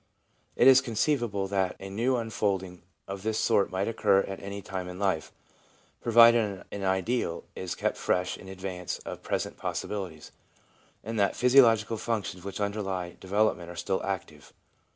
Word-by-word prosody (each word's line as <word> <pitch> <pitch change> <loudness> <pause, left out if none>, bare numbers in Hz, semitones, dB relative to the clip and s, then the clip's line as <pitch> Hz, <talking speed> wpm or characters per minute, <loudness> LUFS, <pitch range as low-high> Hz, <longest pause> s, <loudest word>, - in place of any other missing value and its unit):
It - - +4
is 130 -1 +8
conceivable 115 -4 0
that 95 -2 0
a 95 - -7
'new 120 +6 +1
unfolding* 100 -6 -2 0.3
of 95 0 -6
this 110 +1 -1
sort 100 - +2
might 95 +1 -1
occur 105 -3 +3
at 95 -1 -6
any 100 0 -6
time 95 -1 -5
in 90 0 -7
life, 95 -5 -1 0.7
provided 115 -4 +5
an 100 - -5
ideal 95 +1 0
is 95 -2 -4
kept - - -1
fresh 90 0 0
in 95 - -12
advance 95 -2 -5
of - - -6
present - - -3
possibilities, 90 -7 -5 0.7
and 115 +1 -3
that 100 -1 +3
the - - -13
physiological 115 -4 +5
functions 105 -5 -3
which 100 +1 -6
underlie 95 -4 -3
development 95 -3 0
are 85 - -8
still 95 +3 -1
active. 90 -6 -5
100 Hz, 155 wpm, -28 LUFS, 95-110 Hz, 0.7 s, is